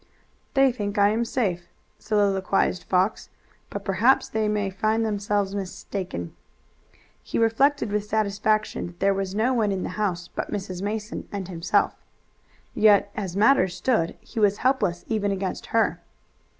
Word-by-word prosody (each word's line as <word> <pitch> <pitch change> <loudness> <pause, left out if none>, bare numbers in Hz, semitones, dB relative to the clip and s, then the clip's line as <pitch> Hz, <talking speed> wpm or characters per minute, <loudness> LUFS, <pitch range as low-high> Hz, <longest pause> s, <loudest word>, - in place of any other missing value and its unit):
"They 270 -1 +5
think 205 -4 -4
I 200 0 +5
am 225 +3 +1
safe," 195 -8 -1 0.3
soliloquized 195 -3 +1
Fox, 190 +3 0 0.4
"but - - -6
perhaps 215 +7 +3
they 220 -1 0
may 205 -2 0
find 220 +4 0
themselves 205 -2 -1
mistaken." 185 - -5 0.9
He - - -4
reflected 230 +2 +2
with 210 0 -1
satisfaction 215 0 0
that 175 0 -13
there 195 0 +3
was 195 0 -3
no 235 +5 +2
one 220 -4 +1
in 190 -1 -2
the - - -3
house 185 -5 -2
but - - -5
Mrs. 190 -3 -4
Mason 210 +2 -4
and 195 -3 -4
himself. 170 -1 +1 0.8
Yet 205 -2 +4
as 195 -3 -4
matters 205 -5 +4
stood 220 -10 0
he 230 - -7
was 205 -1 +3
helpless 255 -10 +1
even 205 -2 0
against 195 -1 -3
her. 225 -1 +1
205 Hz, 150 wpm, -25 LUFS, 190-220 Hz, 0.9 s, They